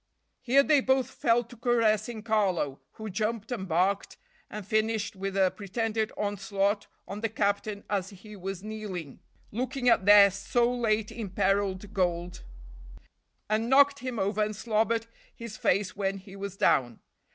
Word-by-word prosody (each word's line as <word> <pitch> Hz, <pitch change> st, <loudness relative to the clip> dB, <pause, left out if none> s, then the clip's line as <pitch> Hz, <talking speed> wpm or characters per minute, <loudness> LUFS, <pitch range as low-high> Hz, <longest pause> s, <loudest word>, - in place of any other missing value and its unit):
Here 260 Hz, +2 st, +4 dB
they 290 Hz, -1 st, +4 dB
both 260 Hz, -1 st, +1 dB
fell 235 Hz, +1 st, +2 dB
to 240 Hz, +1 st, -14 dB
caressing 230 Hz, -2 st, +1 dB
Carlo, 190 Hz, -11 st, 0 dB
who 220 Hz, -1 st, -7 dB
jumped 215 Hz, +3 st, -2 dB
and 200 Hz, -6 st, -3 dB
barked 185 Hz, +4 st, 0 dB, 0.3 s
and 210 Hz, -2 st, -7 dB
finished 215 Hz, -1 st, 0 dB
with 195 Hz, 0 st, -4 dB
a 190 Hz, -1 st, +3 dB
pretended 220 Hz, +2 st, -2 dB
onslaught 205 Hz, 0 st, -1 dB, 0.2 s
on 205 Hz, +2 st, -6 dB
the 225 Hz, -, 0 dB
captain 205 Hz, -1 st, -1 dB
as 195 Hz, -2 st, -1 dB
he 210 Hz, +2 st, -12 dB
was 195 Hz, 0 st, -6 dB
kneeling, 205 Hz, -9 st, -6 dB, 0.3 s
looking 250 Hz, +3 st, -2 dB
at 195 Hz, -4 st, +3 dB
their 205 Hz, -1 st, +8 dB
so 235 Hz, +5 st, 0 dB
late 220 Hz, -3 st, 0 dB
imperiled 195 Hz, -1 st, -1 dB
gold, 175 Hz, -2 st, -1 dB, 1.0 s
and 220 Hz, +2 st, 0 dB
knocked 280 Hz, +1 st, +5 dB
him 255 Hz, -2 st, -5 dB
over 205 Hz, +1 st, 0 dB
and 215 Hz, 0 st, -3 dB
slobbered 225 Hz, +1 st, 0 dB, 0.3 s
his 230 Hz, -2 st, -8 dB
face 200 Hz, 0 st, 0 dB
when 195 Hz, -1 st, -1 dB
he 190 Hz, 0 st, -12 dB
was 200 Hz, -1 st, -6 dB
down. 120 Hz, -, +2 dB
210 Hz, 150 wpm, -28 LUFS, 195-230 Hz, 1.0 s, their